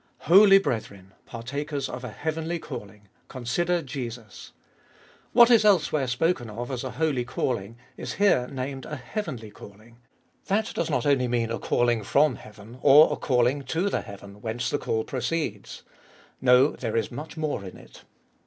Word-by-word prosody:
Holy 195 Hz, +4 st, +7 dB
brethren! 100 Hz, -, -4 dB
partakers 140 Hz, +4 st, -4 dB
of 125 Hz, 0 st, -7 dB
a 125 Hz, -, -5 dB
heavenly 160 Hz, +7 st, -3 dB
calling, 105 Hz, -8 st, -9 dB, 0.2 s
consider 165 Hz, +8 st, -1 dB
Jesus! 120 Hz, -6 st, -8 dB, 0.8 s
What 240 Hz, 0 st, +7 dB
is 225 Hz, -3 st, +6 dB
elsewhere 155 Hz, -9 st, +3 dB
spoken 125 Hz, -1 st, 0 dB
of 120 Hz, +4 st, -6 dB
as 130 Hz, -1 st, -4 dB
a 130 Hz, -, -4 dB
holy 150 Hz, -6 st, 0 dB
calling 115 Hz, -3 st, -3 dB, 0.2 s
is -, -, -5 dB
here 185 Hz, -12 st, +2 dB
named 135 Hz, 0 st, -5 dB
a 150 Hz, -, -5 dB
heavenly 125 Hz, -, -6 dB
calling. 110 Hz, +4 st, -15 dB, 0.5 s
That 215 Hz, +3 st, 0 dB
does 165 Hz, -, -2 dB
not 125 Hz, -5 st, 0 dB
only 135 Hz, -3 st, +2 dB
mean 120 Hz, -2 st, -1 dB
a 115 Hz, -, -3 dB
calling 120 Hz, -2 st, +1 dB
from 140 Hz, +4 st, +2 dB
heaven, 110 Hz, +3 st, -13 dB
or 150 Hz, +3 st, +7 dB
a -, -, -1 dB
calling 125 Hz, +1 st, +1 dB
to 165 Hz, +9 st, -1 dB
the -, -, 0 dB
heaven, 100 Hz, -1 st, -12 dB
whence 115 Hz, +2 st, -3 dB
the 145 Hz, -, 0 dB
call 110 Hz, 0 st, -1 dB
proceeds. 140 Hz, +7 st, -4 dB, 0.6 s
No, 125 Hz, +2 st, +5 dB
there 115 Hz, -3 st, -3 dB
is 115 Hz, -, -1 dB
much 150 Hz, +6 st, -8 dB
more 155 Hz, -9 st, -2 dB
in 95 Hz, -2 st, -9 dB
it. -, -, -16 dB
130 Hz, 160 wpm, -26 LUFS, 115-155 Hz, 0.8 s, Holy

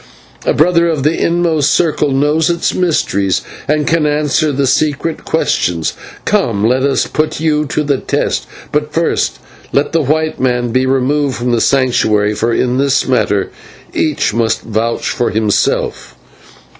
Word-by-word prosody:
A -, -, +4 dB
brother 170 Hz, +2 st, +3 dB
of 155 Hz, -5 st, -1 dB
the 155 Hz, +3 st, +2 dB
inmost 170 Hz, -4 st, +1 dB
circle 155 Hz, -3 st, +1 dB
knows 150 Hz, +4 st, +1 dB
its 170 Hz, 0 st, 0 dB
mysteries 100 Hz, -, 0 dB, 0.3 s
and 150 Hz, +1 st, +1 dB
can 160 Hz, -1 st, +1 dB
answer 150 Hz, +1 st, +1 dB
the 140 Hz, 0 st, 0 dB
secret 150 Hz, +4 st, 0 dB
questions. 85 Hz, -2 st, 0 dB, 0.3 s
Come, 100 Hz, +1 st, +1 dB
let 130 Hz, +2 st, +2 dB
us 135 Hz, 0 st, +1 dB
put 155 Hz, 0 st, -2 dB
you 150 Hz, -1 st, +1 dB
to 150 Hz, -, -1 dB
the 140 Hz, -3 st, 0 dB
test, -, -, -2 dB, 0.2 s
but 150 Hz, 0 st, -1 dB
first 165 Hz, +1 st, 0 dB, 0.3 s
let 140 Hz, -, +1 dB
the 165 Hz, -, +2 dB
white 155 Hz, +3 st, -1 dB
man 125 Hz, -2 st, 0 dB
be 130 Hz, +2 st, +1 dB
removed 135 Hz, +1 st, +1 dB
from 120 Hz, +1 st, -2 dB
the 120 Hz, -1 st, +1 dB
Sanctuary, 110 Hz, -6 st, +2 dB
for 110 Hz, +3 st, -1 dB
in 125 Hz, +2 st, 0 dB
this 140 Hz, -1 st, +1 dB
matter 105 Hz, -6 st, +1 dB, 0.4 s
each 150 Hz, -8 st, 0 dB
must 115 Hz, -1 st, 0 dB
vouch 115 Hz, +1 st, -2 dB
for 120 Hz, -, 0 dB
himself." 105 Hz, -1 st, -1 dB
140 Hz, 155 wpm, -14 LUFS, 120-155 Hz, 0.4 s, A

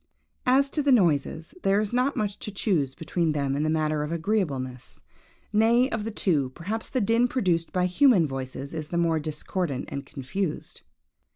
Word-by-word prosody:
As 275 Hz, +2 st, +4 dB
to 300 Hz, -, 0 dB
the 285 Hz, -1 st, +2 dB
noises, 160 Hz, -, +2 dB
there 195 Hz, +1 st, +3 dB
is 215 Hz, +1 st, -2 dB
not 255 Hz, +3 st, +1 dB
much 205 Hz, -1 st, -2 dB
to -, -, -5 dB
choose 170 Hz, -, 0 dB
between 165 Hz, 0 st, -1 dB
them 140 Hz, -2 st, -1 dB
in 145 Hz, -, 0 dB
the 155 Hz, -, +1 dB
matter 155 Hz, -1 st, +1 dB
of 150 Hz, +1 st, -3 dB
agreeableness. 155 Hz, -, -2 dB, 0.5 s
Nay, 235 Hz, +5 st, +4 dB
of 215 Hz, -1 st, -2 dB
the -, -, -2 dB
two, 160 Hz, -11 st, 0 dB
perhaps 215 Hz, +6 st, -4 dB
the 260 Hz, -, 0 dB
din 230 Hz, +3 st, +3 dB
produced 180 Hz, -10 st, 0 dB
by 180 Hz, -1 st, +1 dB
human 185 Hz, -, +4 dB
voices 135 Hz, 0 st, -5 dB
is 155 Hz, -2 st, -4 dB
the 170 Hz, -, -2 dB
more 165 Hz, -2 st, +2 dB
discordant 155 Hz, -1 st, -3 dB
and 140 Hz, -, -4 dB
confused. 150 Hz, +6 st, -4 dB
170 Hz, 180 wpm, -26 LUFS, 150-215 Hz, 0.5 s, As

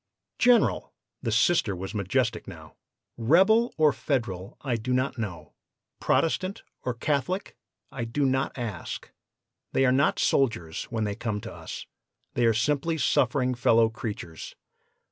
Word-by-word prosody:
"'General!' 230 Hz, -, +3 dB, 0.3 s
the 115 Hz, -, -2 dB
Sister 110 Hz, -, +3 dB
was 95 Hz, +3 st, -6 dB
majestic 110 Hz, +3 st, 0 dB
now -, -, -11 dB, 0.4 s
'Rebel 190 Hz, -, +4 dB
or 155 Hz, -2 st, +5 dB
Federal, 100 Hz, -, -3 dB
I 130 Hz, -4 st, -1 dB
do 115 Hz, +3 st, -2 dB
not 130 Hz, 0 st, 0 dB
know; 90 Hz, -9 st, -5 dB, 0.5 s
Protestant 185 Hz, +4 st, 0 dB, 0.2 s
or 125 Hz, -, -2 dB
Catholic, 150 Hz, -, -1 dB, 0.4 s
I 125 Hz, -4 st, -4 dB
do 140 Hz, +5 st, 0 dB
not 130 Hz, +1 st, 0 dB
ask. 110 Hz, -9 st, -5 dB, 0.6 s
They 135 Hz, -, +3 dB
are 125 Hz, -, +4 dB
not 140 Hz, +3 st, +3 dB
soldiers 85 Hz, -, +1 dB
when 115 Hz, -3 st, -3 dB
they 105 Hz, -1 st, -1 dB
come 110 Hz, -1 st, -3 dB
to -, -, -8 dB
us; -, -, -8 dB, 0.5 s
they 120 Hz, -1 st, +2 dB
are 115 Hz, -, +4 dB
simply 150 Hz, +7 st, +1 dB
suffering 130 Hz, -2 st, +2 dB
fellow 115 Hz, -2 st, +4 dB
creatures. 110 Hz, -8 st, -7 dB
120 Hz, 140 wpm, -27 LUFS, 110-140 Hz, 0.6 s, or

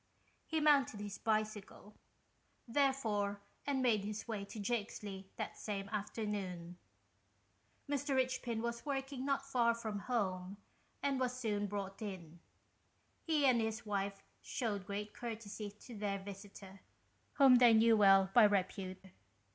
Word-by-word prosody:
He 320 Hz, -, 0 dB
mounted 280 Hz, -8 st, +4 dB
his 205 Hz, -1 st, -6 dB
bicycle, 215 Hz, -1 st, -2 dB, 0.7 s
therefore, 230 Hz, -6 st, +1 dB, 0.3 s
and 270 Hz, -2 st, +1 dB
made 220 Hz, -5 st, +3 dB
his 210 Hz, +2 st, -5 dB
way 215 Hz, -3 st, -3 dB
to 215 Hz, +2 st, -8 dB
Jakesley 205 Hz, -3 st, -3 dB
that -, -, -5 dB
same 200 Hz, -2 st, -4 dB
afternoon. 200 Hz, -5 st, -4 dB, 1.1 s
Mr. 285 Hz, -1 st, 0 dB
Richpin 255 Hz, -3 st, 0 dB
was 235 Hz, 0 st, -3 dB
working 270 Hz, -2 st, -3 dB
not 275 Hz, -1 st, 0 dB
far 240 Hz, -4 st, +2 dB
from 220 Hz, -3 st, -4 dB
home, 195 Hz, -5 st, -2 dB, 0.5 s
and 275 Hz, -2 st, +1 dB
was 250 Hz, -1 st, -1 dB
soon 205 Hz, -4 st, -1 dB
brought 195 Hz, 0 st, -5 dB
in. 175 Hz, -5 st, -7 dB, 0.8 s
He 310 Hz, -3 st, +2 dB
and 250 Hz, -3 st, +5 dB
his 220 Hz, 0 st, -2 dB
wife 200 Hz, -1 st, -2 dB, 0.2 s
shewed 205 Hz, -6 st, -3 dB
great 205 Hz, +1 st, -4 dB
courtesy 220 Hz, -3 st, -5 dB
to 210 Hz, +4 st, -12 dB
their 205 Hz, -1 st, -1 dB
visitor, 195 Hz, 0 st, -10 dB, 0.5 s
whom 270 Hz, -3 st, +7 dB
they 240 Hz, -1 st, +7 dB
knew 225 Hz, 0 st, +6 dB
well 195 Hz, -2 st, +6 dB
by 235 Hz, -3 st, +8 dB
repute. 190 Hz, -1 st, -1 dB
215 Hz, 130 wpm, -36 LUFS, 200-245 Hz, 1.1 s, by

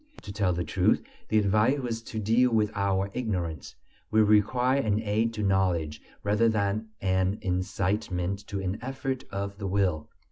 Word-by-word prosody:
To 100 Hz, -, -7 dB
tell 100 Hz, -3 st, +1 dB
the 85 Hz, 0 st, -1 dB
truth, 75 Hz, -, +2 dB, 0.3 s
the 110 Hz, -, +3 dB
advice 105 Hz, +6 st, +3 dB
was 120 Hz, -4 st, -3 dB
to 115 Hz, -, -8 dB
deal 115 Hz, +4 st, +3 dB
with 110 Hz, -2 st, +2 dB
our 100 Hz, -1 st, 0 dB
ignorance; 90 Hz, -, -3 dB, 0.3 s
we 110 Hz, 0 st, +4 dB
required 125 Hz, +6 st, +3 dB
an 105 Hz, -1 st, +1 dB
aid 110 Hz, +1 st, 0 dB
to 105 Hz, -, -2 dB
knowledge 90 Hz, -6 st, +1 dB, 0.2 s
rather 105 Hz, +3 st, +3 dB
than 105 Hz, 0 st, -1 dB
an 95 Hz, +1 st, +1 dB
incitement 95 Hz, 0 st, -1 dB
to 100 Hz, -, -3 dB
an 95 Hz, +2 st, -3 dB
effort 135 Hz, +1 st, -4 dB
of 100 Hz, 0 st, -4 dB
the 100 Hz, -, -3 dB
will. 90 Hz, -5 st, 0 dB
100 Hz, 165 wpm, -28 LUFS, 95-110 Hz, 0.3 s, we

